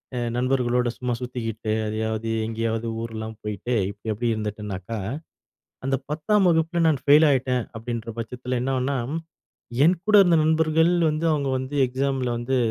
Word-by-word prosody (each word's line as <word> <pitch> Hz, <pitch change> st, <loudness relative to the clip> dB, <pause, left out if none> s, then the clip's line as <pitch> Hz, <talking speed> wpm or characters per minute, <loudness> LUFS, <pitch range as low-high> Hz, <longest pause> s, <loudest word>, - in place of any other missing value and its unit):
அ -, -, -1 dB, 0.2 s
நண்பர்களோடு 125 Hz, -1 st, +1 dB
சும்மா 125 Hz, -1 st, -2 dB
சுத்திகிட்டு, 115 Hz, -3 st, -3 dB
எதையாவது 110 Hz, +1 st, -2 dB
எங்கேயாவது 115 Hz, 0 st, -2 dB
ஊர்லாம் 110 Hz, -1 st, -6 dB
போயிட்டு, 105 Hz, +4 st, -2 dB
இப்படி 105 Hz, +2 st, -5 dB
எப்படி 120 Hz, +3 st, -1 dB
இருந்துட்டேனாக்கா, 105 Hz, -1 st, -4 dB, 0.9 s
அந்த 135 Hz, 0 st, +2 dB
10தாம் 190 Hz, +6 st, +2 dB
வகுப்புல 165 Hz, +1 st, +1 dB
நான் 145 Hz, -4 st, +2 dB
ஃபெயில் 150 Hz, +2 st, +7 dB
ஆயிட்டேன், 125 Hz, -2 st, +1 dB
அப்படின்ற 115 Hz, 0 st, -5 dB
பட்சத்துல, 125 Hz, +2 st, -3 dB
என்னாகும்னா? 135 Hz, +1 st, 0 dB, 0.9 s
என் 175 Hz, +3 st, +5 dB
கூட 210 Hz, -, +5 dB
இருந்த 175 Hz, -3 st, +4 dB
நண்பர்கள் 160 Hz, +1 st, +3 dB, 0.2 s
வந்து, 155 Hz, +2 st, -1 dB
அவங்க 140 Hz, -2 st, -1 dB
வந்து 130 Hz, +3 st, -5 dB
எக்ஸாமில 130 Hz, 0 st, -1 dB
வந்து 130 Hz, +2 st, -1 dB
125 Hz, 135 wpm, -24 LUFS, 115-140 Hz, 0.9 s, ஃபெயில்